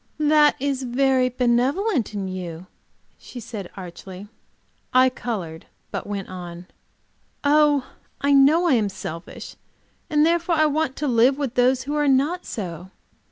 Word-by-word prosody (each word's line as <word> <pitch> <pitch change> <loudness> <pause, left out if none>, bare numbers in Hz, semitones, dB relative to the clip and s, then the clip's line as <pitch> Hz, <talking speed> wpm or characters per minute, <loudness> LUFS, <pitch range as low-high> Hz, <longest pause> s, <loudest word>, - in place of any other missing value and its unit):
"That 300 0 +4
is 275 -1 -1
very 260 0 +2
benevolent 250 - 0
in 195 -2 -3
you," 180 -2 -6 0.5
she 250 - -10
said, 220 -5 -7
archly. 185 +2 -9 0.6
I 255 0 +5
colored, 185 -11 -6 0.2
but - - -5
went 200 -2 -4
on. 175 -1 -8 0.8
"Oh, 290 -2 +3 0.3
I 280 0 +2
know 290 +6 +5
I 335 - +3
am 215 -4 +2
selfish. 170 -3 -8 0.5
And 300 0 +3
therefore 340 +1 +1
I 310 0 +3
want 300 -2 -1
live 255 0 +3
with 275 -5 -3
those 255 +1 +2
who 285 +2 -4
are 295 -1 +1
not 285 +7 +1
so. 180 -4 -6
255 Hz, 140 wpm, -23 LUFS, 195-290 Hz, 0.8 s, I